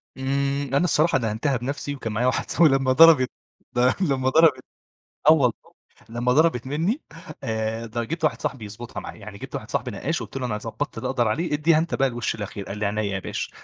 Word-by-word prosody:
إمم، 140 +1 -1
أنا 140 - +3
الصراحة 155 -2 +3
دهنتها 120 +3 -1
بنَفسي، 140 +3 -4
وكان 115 -5 -5
معايا 120 +4 +1
واحد 130 - -1
صاحبي، 165 -2 +5
لمّا 135 -1 +2
ضربت 145 -2 +7 0.7
لمّا 135 -7 +1
ضربت 150 -3 +4 0.7
آه - - +10
والله، 130 -7 +3 0.6
لمّا 120 +2 0
ضربت 150 -4 +2
مني 165 - -1 0.4
آآ، 110 +1 -2
د 115 +2 -6
جبت 165 0 -4
واحد 120 -7 0
صاحبي 125 -5 -3
يضبطها 110 +4 -7
معايا. - - -9
يعني 100 0 -9
جبت - - -9
واحد - - -5
صاحبي - - -2
نقّاش، - - -2
قلت - - -9
له: 130 -2 -2
"أنا 105 -3 -2
ضبّطت 115 +4 -5
اللي 125 - -3
أقدر 120 -4 +1
عليه، 160 +11 -1
إديها 155 +2 +3
أنت 165 +2 -1
بقى 135 -1 +2
الوش 120 -2 -2
الأخير"، 100 -1 -6
قال 100 - -6
لي: 105 - 0
"عينيا 105 +2 -1
يا 100 -2 -2
باشا"، - - -4
130 Hz, 205 wpm, -24 LUFS, 115-145 Hz, 0.7 s, آه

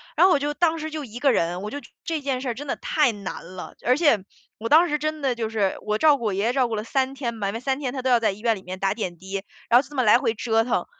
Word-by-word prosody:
然 - - +6
后 375 - +5
我 - - +3
就， 290 +1 -1
当 330 +1 +2
时 315 0 -4
就 305 -2 -5
一 230 -1 -10
个 275 +1 +4
人， 175 -1 0
我 210 +1 -5
就 - - -4 0.3
这 325 -2 -2
件 270 -2 -2
事 260 - -3
儿 - - -1
真 290 +5 -8
的 - - -1
太 300 -5 +1
难 200 -5 -7
了。 180 - -8
而 250 - +4
且 290 -7 +4 0.4
我 225 - -4
当 325 +7 +6
时 300 - +1
真 310 +1 -3
的 270 -2 +1
就 225 -2 -2
是， 205 -4 0
我 210 0 -1
照 300 +3 +5
顾 235 - -6
我 210 - +1
爷 195 +2 -1
爷 230 - +2
照 260 -2 +2
顾 225 - -3
了 210 - -3
3 265 +3 0
天 250 -4 -3
嘛， 205 -3 -3
因 - - -4
为 225 - -3
3 265 +2 -1
天 265 -4 -3
他 265 - -3
都 260 - 0
要 245 -2 +5
在 225 - +2
医 195 - -10
院 230 0 +2
里 - - -11
面 185 0 -7
打 195 0 +1
点 185 -6 -4
滴， 190 +3 -8 0.3
然 235 - +7
后 - - +2
就 275 - -16
这 295 - -11
么 255 - +2
来 210 0 +6
回 240 -3 0
折 225 0 +1
腾。 250 - 0
245 Hz, 350 characters per minute, -24 LUFS, 215-285 Hz, 0.4 s, 然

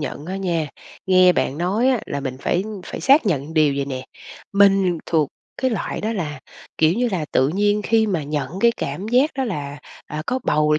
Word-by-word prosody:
nhận 145 +1 -5
á 190 - -4
nha. 170 -6 -1 0.4
Nghe 185 -1 +6
bạn 145 -4 -1
nói 200 +9 +1
á 255 -4 +2
là 140 - -3
mình 130 -2 -4
phải 175 - 0 0.2
phải - - -6
xác 275 -3 +5
nhận 155 -2 -1
điều 150 -3 +4
vầy 140 - 0
nè, 130 -2 -5 0.5
mình 195 -3 +4
thuộc 155 -4 +1 0.3
cái 260 - +2
loại 220 - -3
đó 220 +2 -1
là, 150 -9 -4 0.4
kiểu 160 +1 +4
như 245 +3 +1
là, 170 -5 -1
tự 130 - +3
nhiên 205 +5 +1
khi 220 0 +2
mà 180 -6 -1
nhận 145 -1 -3
cái 235 +1 +5
cảm 165 +10 -4
giác 255 +6 +3
đó 270 - -1
là, 145 - -4 0.3
à, 150 +1 -5
có 255 - 0
bầu 150 0 +2
rồi 150 - +3
175 Hz, 215 wpm, -21 LUFS, 150-210 Hz, 0.5 s, Nghe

